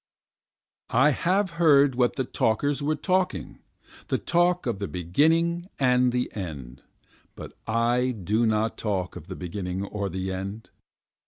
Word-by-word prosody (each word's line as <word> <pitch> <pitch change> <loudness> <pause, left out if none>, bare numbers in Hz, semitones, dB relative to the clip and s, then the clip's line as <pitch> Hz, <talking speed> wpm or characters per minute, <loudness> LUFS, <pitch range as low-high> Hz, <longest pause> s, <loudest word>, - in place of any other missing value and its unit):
3 115 - +1
I 140 +3 +6
have 185 +7 +1
heard 145 -4 +6
what 125 -1 +1
the 130 - 0
talkers 135 +5 0
were 150 +2 0
talking, 180 - -1 0.5
the - - 0
talk 175 0 +1
of 115 -6 -2
the 100 - -3
beginning 165 - +1
and 125 -2 +3
the 125 0 -1
end, 70 - -7 0.5
But - - -10
I 120 +3 +1
do 110 0 0
not 110 +1 0
talk 95 -5 -2
of - - -10
the - - -6
beginning 90 +1 -4
or 100 -1 -3
the 95 +1 -3
end. 100 +4 -6
120 Hz, 150 wpm, -26 LUFS, 95-145 Hz, 0.5 s, I